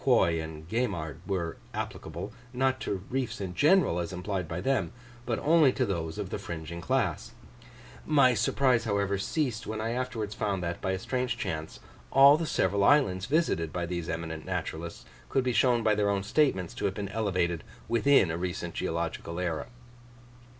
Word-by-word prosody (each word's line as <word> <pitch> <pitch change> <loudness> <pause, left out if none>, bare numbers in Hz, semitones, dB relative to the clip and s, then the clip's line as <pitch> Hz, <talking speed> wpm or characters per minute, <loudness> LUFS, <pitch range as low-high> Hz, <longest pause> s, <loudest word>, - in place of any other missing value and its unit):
Quoy 85 -1 +3
and 80 0 -9
Gaimard 90 - -2
were 90 -4 -2 0.2
applicable, 85 +7 -5 0.2
not 130 +1 +1
to 95 -2 -3
reefs 130 -1 -2
in 95 -3 -4
general 150 - +4
as 85 -1 -3
implied 90 -1 -3
by 85 +2 -4
them, 135 +8 0 0.4
but 115 -2 0
only 155 -3 +5
to 130 - +1
those 80 -6 -3
of - - -4
the - - -3
fringing 85 +1 -6
class; 80 - -1 0.7
my 140 -5 +5
surprise, 125 +1 +2
however, 100 -2 0
ceased 125 -1 -1
when 110 0 -3
I 115 +1 -1
afterwards 120 -4 -3
found 100 -4 -1
that, 85 0 -3
by 95 - 0
a - - -1
strange 125 +6 -2
chance, 80 0 -4 0.3
all 140 +1 +8
the 160 +1 -2
several 100 -4 +1
islands 100 -8 +4
visited 135 - +1
by 90 -1 -2
these 85 -1 -4
eminent 80 -1 -4
naturalists, 85 -6 -4 0.2
could 135 - +2
be 125 -1 0
shown 120 +1 +3
by 110 -1 +4
their 105 -1 +1
own 100 -1 0
statements 105 - +1
to - - -3
have 95 - 0
been 100 -2 -4
elevated 90 -6 0 0.2
within 115 -5 +4
a 80 - -2
recent 90 -1 -3
geological 85 +1 -3
era. 85 -3 -2
100 Hz, 175 wpm, -29 LUFS, 85-125 Hz, 0.7 s, all